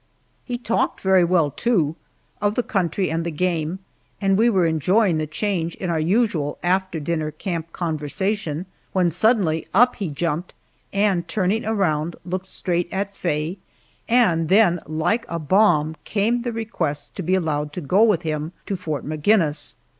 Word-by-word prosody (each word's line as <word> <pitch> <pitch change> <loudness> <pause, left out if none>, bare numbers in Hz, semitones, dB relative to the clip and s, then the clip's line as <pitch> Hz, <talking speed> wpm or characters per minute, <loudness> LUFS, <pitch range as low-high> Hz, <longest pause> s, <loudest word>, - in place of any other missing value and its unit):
He 245 -1 -3
talked 235 -1 -1
very 190 -1 +4
well, 170 -4 +2
too, 165 - +1 0.5
of 205 +1 +1
the 245 - +1
country 185 -3 -1
and 165 +1 -1
the 170 - -2
game, 165 +1 -1 0.4
and 195 -1 +2
we 225 +4 +4
were 190 -6 +3
enjoying 170 +4 +2
the 155 0 -2
change 170 0 -2
in 180 -2 -3
our 165 - 0
usual 170 -4 +1
after 185 -1 0
dinner 155 0 -2
camp 165 0 -5
conversation, 165 +2 -2 0.3
when 180 -3 +2
suddenly 180 -3 +2
up 245 +4 +5
he 200 -7 -3
jumped, 165 +3 -3 0.4
and 195 -4 +1
turning 210 +2 0
around 170 -7 0
looked 185 +1 -4
straight 175 -1 -2
at 200 +1 -3
Faye, 165 +2 -2 0.5
and 180 -10 +3
then 190 -4 +5
like 160 +9 0
a 170 - -2
bomb 160 -2 +3
came 225 +4 0
the 240 0 -3
request 220 -10 -3
to - - -4
be 185 +2 +1
allowed 150 -4 -1
to - - -4
go 180 +8 +2
with 210 -7 +4
him 155 +1 -3
to 200 - -2
Fort 155 -5 -4
Maginnis! 155 -1 +1
175 Hz, 160 wpm, -22 LUFS, 155-200 Hz, 0.5 s, up